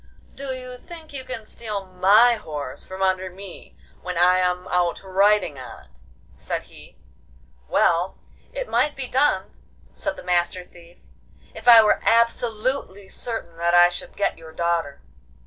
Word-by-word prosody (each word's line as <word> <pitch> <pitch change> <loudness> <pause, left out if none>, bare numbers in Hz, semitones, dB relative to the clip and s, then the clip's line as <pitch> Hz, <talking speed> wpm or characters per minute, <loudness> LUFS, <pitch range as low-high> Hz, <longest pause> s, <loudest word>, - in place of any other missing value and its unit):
'Do 275 - -6
you 255 -1 -6
think 325 -2 -12
you 265 -2 -4
can 255 -4 -7
steal 210 -3 -5
my 195 +6 +5
horse 150 - -6
from 190 0 -4
under 185 0 0
me 190 0 -12 0.2
when 180 -1 -5
I 180 +1 +5
am 180 0 -1
out 175 0 0
riding 195 -5 +2
on 125 -2 -10
it?' - - -24 0.5
said - - -4
he. - - -15 0.7
'Well, 175 - +1 0.3
it - - -5
might 295 - +1
be 270 - -4
done,' 265 +4 0 0.4
said - - -4
the - - -9
Master 180 0 0
Thief, 175 -1 -18 0.6
'if 220 +2 -11
I 230 -2 +10
were 210 - +2
absolutely 230 -2 0
certain 225 -9 -6
that 170 +1 +1
I 175 0 +7
should 175 - -8
get 200 - -1
your 160 -1 -12
daughter. 170 -4 -1
190 Hz, 155 wpm, -23 LUFS, 175-235 Hz, 0.7 s, I